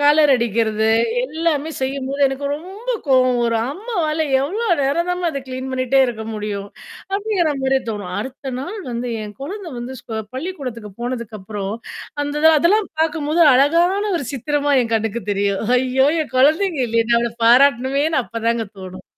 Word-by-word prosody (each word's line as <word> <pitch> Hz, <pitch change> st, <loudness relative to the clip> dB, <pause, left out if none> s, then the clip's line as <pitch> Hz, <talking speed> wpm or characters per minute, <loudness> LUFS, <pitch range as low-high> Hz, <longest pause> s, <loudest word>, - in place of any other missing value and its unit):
Colour 295 Hz, 0 st, +5 dB
அடிக்கிறது 220 Hz, -2 st, +1 dB, 0.4 s
எல்லாமே 315 Hz, +1 st, -1 dB
செய்யும்போது 270 Hz, +1 st, -2 dB
எனக்கு 270 Hz, +1 st, -4 dB
ரொம்ப 385 Hz, +9 st, -11 dB, 0.2 s
கோவம் 255 Hz, -2 st, +4 dB
வரும். 230 Hz, -1 st, +1 dB
அம்மாவால 320 Hz, -6 st, -1 dB, 0.2 s
எவ்ளோ 415 Hz, +11 st, -2 dB, 0.2 s
நேரம்தாம்மா 340 Hz, +5 st, 0 dB
அதை 275 Hz, -2 st, -4 dB
கிளீன் 260 Hz, +1 st, -5 dB
பண்ணிகிட்டே 260 Hz, +1 st, +2 dB
இருக்க 225 Hz, -3 st, -5 dB
முடியும் 205 Hz, -1 st, -4 dB, 0.4 s
அப்படிங்கிற 395 Hz, -6 st, +1 dB
மாரியே 265 Hz, 0 st, +2 dB
தோணும். 200 Hz, -4 st, -5 dB
அடுத்த 265 Hz, +3 st, -6 dB
நாள் 375 Hz, +10 st, -6 dB
வந்து 240 Hz, +1 st, -3 dB, 0.2 s
என் 210 Hz, -1 st, -10 dB
குழந்தை 380 Hz, +4 st, -6 dB
வந்து, 245 Hz, +2 st, -6 dB
ஸ்கூ 225 Hz, -, -8 dB, 0.2 s
பள்ளிக்கூடத்துக்கு 260 Hz, -, -6 dB
போனதுக்கு 235 Hz, -3 st, -4 dB
அப்புறம் 200 Hz, +1 st, -4 dB, 0.5 s
அந்த 290 Hz, 0 st, -3 dB, 0.2 s
அதெல்லாம் 395 Hz, +6 st, +3 dB
பார்க்கும்போது 315 Hz, 0 st, 0 dB
அழகான 340 Hz, +9 st, +3 dB
ஒரு 280 Hz, -, -5 dB
சித்திரமா 290 Hz, +2 st, 0 dB
என் 230 Hz, -1 st, -4 dB
கண்ணுக்கு 225 Hz, 0 st, -1 dB
தெரியும். 200 Hz, -1 st, 0 dB, 0.2 s
ஐயோ! 260 Hz, +2 st, +2 dB
என் 280 Hz, -, -11 dB
குழந்தைங்க 315 Hz, +4 st, +3 dB
இல்லையே 230 Hz, 0 st, +1 dB
நான் 235 Hz, -, +5 dB
அவளை 235 Hz, -, -2 dB
பாராட்டணுமேன்னு 270 Hz, +4 st, +4 dB
அப்போதாங்க 230 Hz, 0 st, -1 dB
தோணும். 185 Hz, -1 st, -9 dB
265 Hz, 145 wpm, -20 LUFS, 230-315 Hz, 0.5 s, Colour